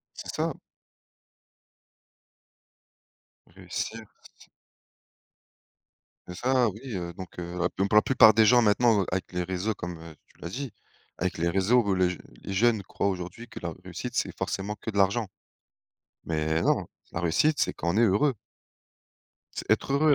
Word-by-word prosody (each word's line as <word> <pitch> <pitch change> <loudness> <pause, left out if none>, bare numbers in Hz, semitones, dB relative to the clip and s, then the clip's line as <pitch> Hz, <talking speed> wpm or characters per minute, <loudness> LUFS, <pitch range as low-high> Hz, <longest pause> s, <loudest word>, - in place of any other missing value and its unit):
C'est - - -9
ça! - - 0 2.9
Réussir 95 +5 -5 0.4
c - - -19 1.8
c'est 90 - -6
ça, 125 -2 +2
oui, 105 +3 -7 0.2
heu, 85 -1 -4
donc 95 -1 -10
heu, 85 +1 -5
la 90 0 +2
p - - -25
même 100 +1 +2
pour 105 - +2
la 105 - +8
plupart 110 -5 +6
des 110 0 +6
gens 120 +2 +6
maintenant 110 0 +4
o - - -3
avec 90 0 -3
les 90 0 -1
réseaux 95 +4 -2
comme, 85 -3 -6
heu, 80 -1 -11
tu - - -27
l'as 85 - -5
dit, 130 +3 -5 0.5
avec 90 -2 -2
les 85 +1 +1
réseaux 100 +7 +3
où 100 -2 +1
les 90 -1 +2
j 90 - -5 0.2
les 95 - -5
jeunes 110 +1 +3
croient 100 - -2
aujourd'hui 95 +5 -5
que 110 - -8
la 85 -2 -4
réussite - - -6
c'est - - -1
forcément 105 +2 -3
que 110 - -5
de 100 - -3
l'argent. 100 +2 +2 1.0
Mais 80 0 0
non! - - +2 0.3
La 85 - -2
réussite, 145 - +2
c'est - - +1
quand 85 - -4
on - - 0
est - - +4
heureux. 115 +5 +3 1.2
C'est - - -5
être 135 - +2
heureux 145 +1 +5
95 Hz, 175 wpm, -27 LUFS, 90-115 Hz, 2.9 s, la